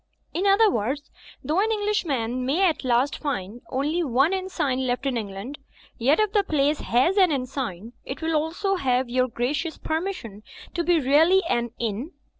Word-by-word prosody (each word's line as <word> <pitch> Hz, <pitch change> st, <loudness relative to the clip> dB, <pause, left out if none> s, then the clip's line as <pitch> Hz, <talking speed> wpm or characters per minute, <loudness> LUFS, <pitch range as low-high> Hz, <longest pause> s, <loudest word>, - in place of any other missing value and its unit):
In 380 Hz, +4 st, 0 dB
other 400 Hz, +3 st, +6 dB
words, 265 Hz, -, -2 dB, 0.3 s
though 310 Hz, +5 st, 0 dB
an 440 Hz, +3 st, +2 dB
English 420 Hz, -2 st, 0 dB
man 250 Hz, -4 st, -1 dB
may 305 Hz, +10 st, +2 dB
at 320 Hz, -, -1 dB
last 255 Hz, +3 st, +1 dB
find 235 Hz, -6 st, -4 dB
only 295 Hz, +6 st, 0 dB
one 275 Hz, +5 st, +2 dB
inn 375 Hz, 0 st, -2 dB
sign 265 Hz, -7 st, -1 dB
left 245 Hz, +2 st, -1 dB
in 270 Hz, -2 st, 0 dB
England, 215 Hz, +5 st, -5 dB, 0.4 s
yet 270 Hz, -, +3 dB
if 430 Hz, -2 st, +2 dB
the 410 Hz, -2 st, +3 dB
place 295 Hz, -3 st, +1 dB
has 260 Hz, -, +2 dB
an 370 Hz, -4 st, +5 dB
inn 265 Hz, -3 st, 0 dB
sign, 240 Hz, -5 st, -5 dB
it 265 Hz, -, -6 dB
will 320 Hz, 0 st, -1 dB
also 335 Hz, +6 st, 0 dB
have 255 Hz, -4 st, 0 dB
your 255 Hz, 0 st, +2 dB
gracious 285 Hz, +8 st, -2 dB
permission 315 Hz, -, -4 dB, 0.3 s
to 345 Hz, -, -1 dB
be 345 Hz, -1 st, +3 dB
really 320 Hz, +8 st, +4 dB
an 240 Hz, -4 st, 0 dB
inn?" 235 Hz, -, -3 dB
285 Hz, 185 wpm, -24 LUFS, 245-345 Hz, 0.4 s, other